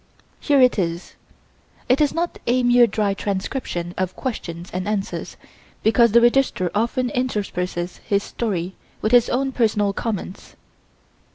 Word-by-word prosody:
Here 285 -2 +2
it 250 -4 +4
is. 170 -1 -3 0.7
It 255 +4 +3
is 295 - +3
not 340 +1 -3
a 250 +1 +2
mere 245 0 +6
dry 205 -1 0
transcription 190 -3 -3
of 185 -1 -2
questions 175 -9 -5
and 185 +2 -3
answers, 205 -2 -3 0.5
because 235 +1 +4
the 235 +2 +6
Registrar 240 -7 +2
often 240 +3 0
intersperses 185 -8 -2
his 200 0 -1
story 190 -6 -3 0.3
with 215 - +1
his 245 -1 +5
own 270 +2 0
personal 210 -5 +1
comments. 205 -3 -5
215 Hz, 135 wpm, -22 LUFS, 185-245 Hz, 0.7 s, mere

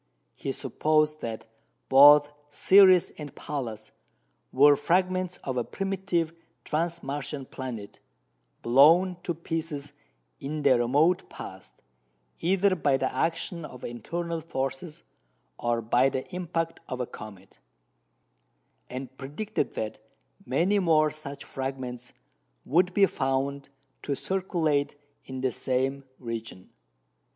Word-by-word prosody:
He - - -4
supposed 155 0 +1
that 115 -1 -5 0.4
both 145 +2 +8 0.2
Ceres 185 +4 +6
and 145 -2 -8
Pallas 115 -7 -5 0.6
were 145 +2 +6
fragments 180 +4 0
of 130 -2 -3
a 120 - +1
primitive 185 - -2 0.3
trans 170 +2 -2
Martian 140 0 -4
planet, 120 -6 -7 0.6
blown 165 +9 +5
to 175 -1 -3
pieces 160 -3 -4 0.5
in 150 +2 -4
the 130 -3 +5
remote 150 +9 +2
past, 95 0 -11 0.6
either 190 +2 +2
by 145 -5 +2
the - - -1
action 165 +4 -1
of 125 -4 -10
internal 165 +8 -4
forces 135 +1 -4 0.6
or 120 -1 0
by 125 +4 +3
the 130 -1 -3
impact 165 -2 -3
of 130 - -4
a 125 - -1
comet; 100 -4 -12 1.3
and 130 0 -7
predicted 150 +11 -3
that 110 -1 -4 0.5
many 175 +11 +2
more 155 -4 +3
such 145 -2 -8
fragments 130 -2 -5 0.5
would 180 +5 +3
be 200 - +6
found 140 -2 -2 0.3
to 140 - -2
circulate 160 -6 0 0.3
in 130 0 -6
the 130 -1 +1
same 135 +3 -1
region. 115 -6 -7
145 Hz, 115 wpm, -27 LUFS, 130-170 Hz, 1.3 s, both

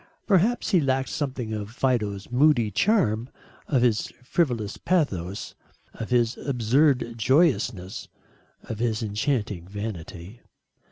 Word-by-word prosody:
Perhaps 215 +5 +2
he 180 -5 +4
lacked 135 -1 0
something 130 -6 -3
of 105 -1 -4
Fido's 110 -5 -1
moody 125 -4 +3
charm, 130 - +2 0.4
of 130 -5 +2
his 115 -4 +2 0.2
frivolous 125 - 0
pathos, 100 - -1 0.4
of 110 - -6
his 120 -2 +2
absurd 130 0 +2
joyousness, 120 - +1 0.6
of 110 - -6
his 115 -1 0
enchanting 105 -5 -2
vanity. 100 0 -7
120 Hz, 110 wpm, -25 LUFS, 105-140 Hz, 0.6 s, he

